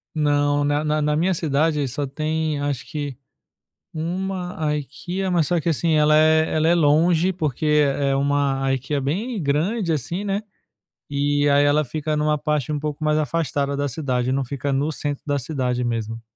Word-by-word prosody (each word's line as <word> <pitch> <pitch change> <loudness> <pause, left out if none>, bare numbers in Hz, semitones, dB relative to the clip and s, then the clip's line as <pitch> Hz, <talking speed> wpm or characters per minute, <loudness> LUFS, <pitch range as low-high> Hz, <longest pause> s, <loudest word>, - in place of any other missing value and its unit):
Não, 145 -1 +2
na 145 +1 +1
na 155 0 0
na 150 0 +1
minha 180 +5 +2
cidade 150 -2 +1
só 140 +3 -3
tem 155 +1 -2
acho 145 -3 -2
que, 145 -4 -4 0.8
1 180 +3 -3 0.2
IKEA, 180 +7 -4
mas 170 -4 +2
só 175 +1 +1
que, 170 - -2
assim, 165 +1 +1
ela 150 0 +4
é 155 +1 +4
ela 160 +1 +2
é 170 - +5
longe, 165 +3 +3
porque 155 -5 -3
é 145 -2 +2
uma 140 -1 +1
IKEA, 135 +2 -2
bem 200 - -2
grande, 165 +7 0
assim, 160 - -3
né. 200 +1 -1 0.7
E 145 0 +1
aí, 140 0 +4
ela 150 +1 +3
fica 155 +3 -3
numa 150 0 +1
parte 150 -1 -1
um 150 - -1
pouco 150 0 -4
mais 155 0 +2
afastada 145 -2 -1
da 145 0 -1
cidade, 125 -2 -1
não 135 0 0
fica 140 +2 -3
no 140 +3 0
centro 145 -1 -4
da 145 -1 0
cidade 125 -3 -2
mesmo. 115 -1 -3
150 Hz, 175 wpm, -22 LUFS, 140-160 Hz, 0.8 s, é